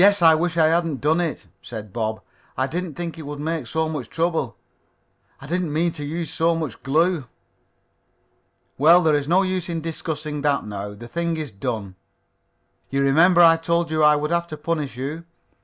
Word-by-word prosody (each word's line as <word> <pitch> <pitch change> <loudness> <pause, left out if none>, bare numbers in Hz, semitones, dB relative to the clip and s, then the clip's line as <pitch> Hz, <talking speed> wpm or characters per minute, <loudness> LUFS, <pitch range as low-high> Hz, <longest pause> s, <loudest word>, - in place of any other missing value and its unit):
I 165 -2 +7
wish 165 +1 0
I 160 - +5
hadn't 165 -3 +1
done 160 +4 +2
it," 160 - -3 0.2
said 105 -4 -8
Bob. 110 -2 -2 0.4
"I 130 - +2
didn't 165 +2 -4
think 170 -2 -5
it 155 - -8
would 145 0 -6
make 155 -3 -3
so 160 +5 0
much 145 -7 -5
trouble. 165 -7 -1 0.8
I - - -11
didn't 175 +1 -1
mean 165 +3 +1
to 150 -2 -7
use 160 +2 -4
so 165 +1 +2
much 155 -9 -4
glue." 155 +3 +1 1.5
"Well, 170 +5 +6
there 160 -1 +3
is 145 -1 0
no 180 +4 +4
use 185 -2 -2
in 165 -1 -2
discussing 155 -2 -4
that 145 -1 +1
now. 105 0 -6
The 120 +3 -10
thing 170 +5 -2
is 155 -5 -4
done. 100 -3 -4 0.9
You 140 0 0
remember 165 +6 +5
I 165 -1 +7
told 170 0 0
you 155 0 +1
I 150 0 +6
would 150 +2 -2
have 170 0 0
to 155 -2 -7
punish 150 -4 -3
you?" 145 +6 -4
155 Hz, 190 wpm, -23 LUFS, 140-170 Hz, 1.5 s, I